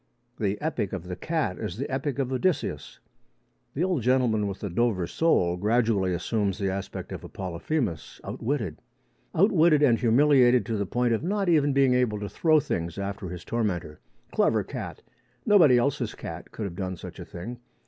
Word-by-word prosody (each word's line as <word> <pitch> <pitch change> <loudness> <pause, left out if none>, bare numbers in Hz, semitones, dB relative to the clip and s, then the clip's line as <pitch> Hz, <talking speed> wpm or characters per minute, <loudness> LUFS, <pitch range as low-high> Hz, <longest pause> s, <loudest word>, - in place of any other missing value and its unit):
The 100 -1 -1
epic 145 - -2
of 95 -4 -4
the 90 0 -6
cat 115 - -2
is 90 - -4
the 135 - -3
epic 135 +1 -2
of 135 -2 -1
Odysseus. 145 - -1 0.8
The 155 - 0
old 180 -7 0
gentleman 120 -4 +2
with 100 -1 -5
the 100 - -3
Dover 105 -3 +1
sole 90 - +2
gradually 105 -2 +2
assumes 100 +2 -1
the 100 -3 -1
aspect 95 0 -5
of - - -6
a - - -9
Polyphemus 90 - -3
outwitted 110 - -3 0.5
outwitted 165 -5 +4
and 120 -5 +4
humiliated 125 -1 +4
to 115 0 -2
the 100 -1 -2
point 120 +3 +1
of 110 - 0
not 195 +2 0
even 145 -4 +4
being 135 -2 +4
able 125 -4 +1
to 105 -1 -5
throw 155 - +3
things 85 - -3
after 100 -1 -4
his 90 0 -8
tormentor. 90 -10 -2 0.3
Clever - - +2
cat! - - -7 0.4
Nobody 165 -12 +6
else's 130 +3 0
cat - - -8
could 110 - -6
have 95 -4 -4
done 95 0 -4
such - - -9
a - - -5
thing. 115 +8 -8
115 Hz, 180 wpm, -26 LUFS, 95-140 Hz, 0.8 s, Nobody